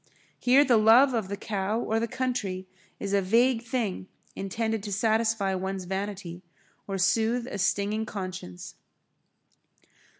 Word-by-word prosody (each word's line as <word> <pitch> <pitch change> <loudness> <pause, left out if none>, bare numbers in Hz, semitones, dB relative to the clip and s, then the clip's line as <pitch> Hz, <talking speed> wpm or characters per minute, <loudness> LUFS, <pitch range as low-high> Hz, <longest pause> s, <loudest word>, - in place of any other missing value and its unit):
Here 265 +4 +5
the 245 -4 +4
love 235 +5 +6
of 220 -5 -1
the 200 +1 -4
cow 205 +1 -2
or 225 -1 0
the 230 - -1
country 215 -8 -3 0.3
is 200 0 -3
a 200 - +3
vague 230 +5 +3
thing 225 -6 -3 0.3
intended 220 +3 -2
to 205 0 -6
satisfy 220 -1 +1
one's 190 0 -3
vanity, 190 -2 -5 0.5
or 195 -1 -3
soothe 225 +6 +1
a 205 - -6
stinging 205 +3 0
conscience. 185 - -7
210 Hz, 135 wpm, -27 LUFS, 195-230 Hz, 0.5 s, love